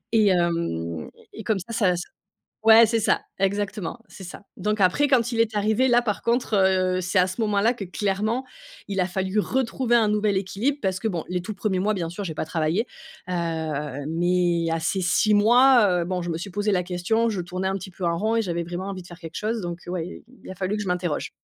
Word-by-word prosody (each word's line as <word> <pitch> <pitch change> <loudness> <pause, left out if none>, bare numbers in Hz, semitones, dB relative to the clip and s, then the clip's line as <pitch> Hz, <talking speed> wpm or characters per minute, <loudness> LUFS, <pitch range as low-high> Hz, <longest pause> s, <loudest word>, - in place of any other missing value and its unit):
Et 215 -3 +5
hem, 165 - -1 0.2
et - - -9
et - - -8
comme 215 -3 +1
ça, 210 +6 -8
ça 185 -6 +2
c 175 - -3 0.6
ouais, 225 0 +8
c'est 230 0 +1
ça, 215 - +2 0.2
exactement, 200 +1 -2
c'est 190 - -12
ça, 180 - -9 0.2
donc 210 +2 -1
après, 190 +11 +3
quand 245 -3 +2
il 230 - -2
est 220 -1 +2
arrivé, 220 +5 +2
là, 240 0 +4
par 210 -4 -3
contre, 235 -2 +1
heu, 185 -1 +2
c'est 185 +2 +1
à 180 - +4
ce 185 - -7
moment-là 210 +2 +2
que 225 -5 -7
clairement, 210 +6 -1 0.4
il 195 -2 -3
a 180 - +3
fallu 190 +2 -2
retrouver 240 +2 +1
un 225 -2 +4
nouvel 210 -1 +1
équilibre 215 +9 -1
parce 190 -2 0
que 225 - -1
bon 175 -6 -2
les 180 0 -1
tout 215 - -5
1ers 200 -1 -1
mois, 210 +3 +1
bien 170 -4 -3
sûr 175 +4 -6
j'ai 165 -5 -4
pas - - -3
travaillé, 165 +7 0 0.4
heu, 155 -5 -3
mais 175 0 +1
à 165 - 0
ces 185 +4 -1
6 210 +4 +3
mois, 240 +2 +6
heu, - - -2
bon 180 0 -2
je 175 - -3
me 165 - -3
suis 195 - -6
posé 205 +2 -1
la 180 - +2
question 185 +6 0
je 200 -4 -2
tournais 180 +2 -3
un 190 - -1
petit 190 0 -9
peu 180 +1 -9
en 170 -1 +1
rond 220 +5 0
et 230 - +3
j'avais 170 -4 -2
vraiment 175 +3 -5
envie 185 -2 -6
de - - -14
faire 175 0 -12
quelque 165 -1 -8
chose 220 +1 -2
donc 175 -1 -4
ouais, 175 -1 -3
il - - -10 0.2
il - - -11
a - - -8
fallu 190 +3 -2
que 210 - -3
je 205 - -5
m'interroge. 180 -3 -2
190 Hz, 245 wpm, -24 LUFS, 175-215 Hz, 0.6 s, ouais